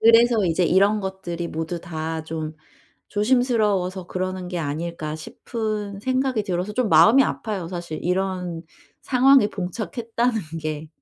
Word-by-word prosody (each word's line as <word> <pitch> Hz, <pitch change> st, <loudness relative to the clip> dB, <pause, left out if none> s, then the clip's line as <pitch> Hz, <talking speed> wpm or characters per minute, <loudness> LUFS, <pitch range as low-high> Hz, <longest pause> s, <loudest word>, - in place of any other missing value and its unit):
그래서 230 Hz, -1 st, +6 dB
이제 175 Hz, +1 st, +2 dB
'이런 200 Hz, +5 st, +4 dB
것들이 180 Hz, -3 st, -4 dB
모두 160 Hz, +2 st, -4 dB
다 160 Hz, -1 st, -4 dB
좀 155 Hz, -1 st, -4 dB, 0.5 s
조심스러워서 210 Hz, -6 st, +1 dB
그러는 185 Hz, 0 st, -3 dB
게 180 Hz, -1 st, -3 dB
아닐까?' 155 Hz, +1 st, -3 dB
싶은 210 Hz, +2 st, -4 dB
생각이 260 Hz, -1 st, 0 dB
들어서 185 Hz, +1 st, -2 dB
좀 250 Hz, 0 st, 0 dB
마음이 210 Hz, +11 st, +7 dB
아파요 200 Hz, -10 st, -3 dB
사실 175 Hz, -3 st, -5 dB
이런 180 Hz, -2 st, -1 dB, 0.4 s
상황에 260 Hz, -3 st, +5 dB
봉착했다는 225 Hz, +4 st, -2 dB, 0.2 s
게. 155 Hz, 0 st, -4 dB
190 Hz, 300 characters per minute, -23 LUFS, 170-220 Hz, 0.5 s, 마음이